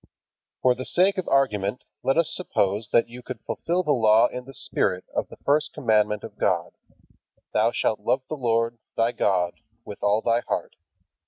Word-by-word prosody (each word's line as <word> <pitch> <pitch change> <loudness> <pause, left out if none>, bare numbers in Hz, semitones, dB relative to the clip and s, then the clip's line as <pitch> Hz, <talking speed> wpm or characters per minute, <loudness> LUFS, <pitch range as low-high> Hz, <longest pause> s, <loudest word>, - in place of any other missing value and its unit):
For 125 - +5
the 130 - -6
sake 185 +7 +3
of 185 - -4
argument 110 -6 +1 0.2
let 135 - +1
us 165 -2 +3
suppose 105 - -1
that 115 - +4
you 120 +2 -10
could - - -7
fulfill 175 +2 -1
the 150 - 0
Law 110 -3 +5
in 125 0 -7
the 135 - -11
spirit 90 -1 -1
of - - -1
the - - -12
first 150 +2 +2
commandment 105 -3 +1
of - - -10
God: - - +1 0.8
"Thou 110 +2 +3
shalt 110 - 0
love 130 +6 0
the 155 - -4
Lord, 115 -3 0 0.2
thy 115 +1 +2
God, 90 -6 0 0.3
with 105 - -9
all 105 +2 +2
thy 115 0 +2
heart." - - -2
115 Hz, 180 wpm, -25 LUFS, 105-135 Hz, 0.8 s, For